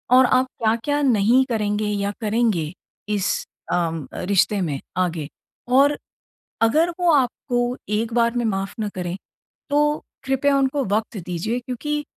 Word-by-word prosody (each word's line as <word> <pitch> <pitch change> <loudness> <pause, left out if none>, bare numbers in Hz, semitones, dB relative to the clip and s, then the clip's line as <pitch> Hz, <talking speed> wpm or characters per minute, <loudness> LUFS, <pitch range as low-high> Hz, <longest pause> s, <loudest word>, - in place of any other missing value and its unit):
और 260 0 +7
आप 255 +1 +3 0.2
क्या-क्या 230 +7 +1
नहीं 245 -1 +4
करेंगे 210 -2 0
या 200 -1 -1
करेंगे, 215 -8 +1 0.4
इस 205 -3 0 0.3
अम, 165 -4 -1
अ, - - -5
रिश्ते 200 +2 +2
में 150 -6 -2 0.2
आगे। 170 -5 0 0.5
और 285 +2 +5 0.6
अगर 305 +10 +4
वो 350 -1 +4
आपको 250 -3 +1
एक 220 +2 -1
बार 235 0 +2
में 240 - +1
माफ़ 195 -2 -1
ना 215 - -1
करें, 180 -1 -3 0.5
तो 295 +1 +2 0.2
कृपया 270 +1 +2
उनको 275 +1 +1
वक़्त 215 +2 -1
दीजिए। 185 +7 -2
क्योंकि 295 +5 -3
230 Hz, 145 wpm, -22 LUFS, 200-265 Hz, 0.6 s, और